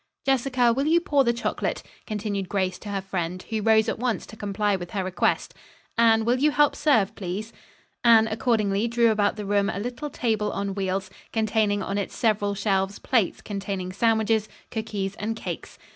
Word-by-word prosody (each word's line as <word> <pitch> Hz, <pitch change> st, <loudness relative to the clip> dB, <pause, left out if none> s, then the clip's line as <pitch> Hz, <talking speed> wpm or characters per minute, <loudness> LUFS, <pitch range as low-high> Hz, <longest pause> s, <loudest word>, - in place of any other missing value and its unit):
"Jessica, 255 Hz, -2 st, +3 dB
will 275 Hz, +4 st, 0 dB
you 335 Hz, +2 st, +5 dB
pour 290 Hz, -5 st, +2 dB
the 235 Hz, -, +3 dB
chocolate?" 235 Hz, -, -2 dB, 0.2 s
continued 205 Hz, -3 st, -3 dB
Grace 185 Hz, -2 st, -1 dB
to 210 Hz, -, -8 dB
her 200 Hz, -1 st, -2 dB
friend, 185 Hz, -1 st, -3 dB
who 220 Hz, -1 st, 0 dB
rose 220 Hz, +1 st, +4 dB
at -, -, -2 dB
once 245 Hz, -2 st, -1 dB
to -, -, -12 dB
comply 205 Hz, 0 st, 0 dB
with 175 Hz, -2 st, -6 dB
her 195 Hz, 0 st, -2 dB
request. 185 Hz, 0 st, 0 dB, 0.4 s
"Anne, 225 Hz, -1 st, +4 dB
will 245 Hz, +2 st, +2 dB
you 300 Hz, +3 st, +4 dB
help 295 Hz, -1 st, +3 dB
serve, 230 Hz, -9 st, +2 dB
please?" 205 Hz, +3 st, -5 dB, 0.5 s
Anne 225 Hz, -2 st, +6 dB
accordingly 220 Hz, -2 st, +1 dB
drew 235 Hz, -1 st, +3 dB
about 210 Hz, -1 st, +1 dB
the 210 Hz, -1 st, -5 dB
room 200 Hz, 0 st, +2 dB
a -, -, -3 dB
little 245 Hz, +8 st, -4 dB
table 220 Hz, -5 st, -1 dB
on 200 Hz, 0 st, -2 dB
wheels, 190 Hz, -1 st, -2 dB, 0.2 s
containing 215 Hz, -2 st, +1 dB
on 200 Hz, +1 st, -2 dB
its 200 Hz, -, -4 dB
several 205 Hz, -3 st, +1 dB
shelves 195 Hz, -1 st, 0 dB
plates 225 Hz, -8 st, 0 dB
containing 195 Hz, -2 st, -4 dB
sandwiches, 220 Hz, 0 st, +2 dB, 0.2 s
cookies 210 Hz, -4 st, -3 dB
and 220 Hz, +2 st, -2 dB
cakes. -, -, -6 dB
215 Hz, 180 wpm, -25 LUFS, 200-230 Hz, 0.5 s, Anne